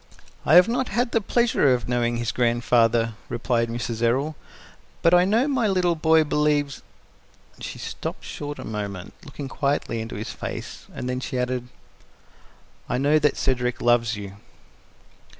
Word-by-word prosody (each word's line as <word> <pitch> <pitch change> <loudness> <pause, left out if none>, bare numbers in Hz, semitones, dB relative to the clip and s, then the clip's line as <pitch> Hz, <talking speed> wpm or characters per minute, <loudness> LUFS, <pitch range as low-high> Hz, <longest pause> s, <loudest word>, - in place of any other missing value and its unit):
"I 155 - +6
have 180 +1 +8
not 250 +2 0
had 240 +3 0
the 225 - +2
pleasure 225 - +2
of 125 - -5
knowing 120 -1 0
his 120 0 -1
grandfather," 115 -1 +2 0.2
replied 115 -1 0
Mrs. 115 -1 -4
Errol, 135 +6 +1 0.7
"but 170 - +5
I 180 0 +6
know 225 +8 +2
my 260 -6 +1
little 180 -3 +2
boy 160 0 +4
believes 145 -1 0 0.4
" - - -30
She - - -6
stopped - - -6
short 145 0 -6
a - - -8
moment, 100 -4 -5
looking 140 -2 -7
quietly 140 -4 -1
into 115 - -6
his 110 +2 -5
face, - - -7
and - - -5
then 125 0 -2
she 130 0 -4
added, 125 0 -2 1.2
"I 125 - 0
know 145 +4 +3
that 150 -1 +2
Cedric 125 -2 0
loves 120 -1 +2
you." 100 -1 -8
130 Hz, 160 wpm, -24 LUFS, 120-160 Hz, 1.2 s, have